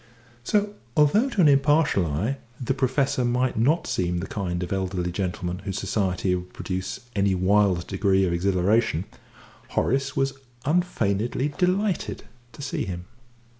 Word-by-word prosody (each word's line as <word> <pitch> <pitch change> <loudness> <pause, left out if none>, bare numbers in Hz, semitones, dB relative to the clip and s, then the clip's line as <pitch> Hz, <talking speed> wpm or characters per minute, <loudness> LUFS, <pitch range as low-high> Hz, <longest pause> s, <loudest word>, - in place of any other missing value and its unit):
So, 205 - +1 0.2
although 200 - +4
to 210 -7 +1
an 160 - +6
impartial 140 - +4
eye 100 - -1 0.2
the 125 - 0
Professor 130 0 +1
might 125 +1 +1
not 150 +10 +2
seem 90 -1 -1
the 85 - -3
kind 90 -3 -3
of 90 - -3
elderly 90 -2 -1
gentleman 90 -1 -3
whose 95 -1 -4
society 95 -2 0
would 90 0 -4
produce 95 0 -4
any 100 -1 +2
wild 95 -1 +3
degree 95 -1 +2
of 85 - 0
exhilaration, 95 +1 +2 0.6
Horace 135 +2 0
was 135 0 +1 0.3
unfeignedly 130 - 0
delighted 185 +4 0 0.3
to 145 - -9
see - - -2
him. 90 -1 -5
100 Hz, 140 wpm, -25 LUFS, 90-140 Hz, 0.6 s, an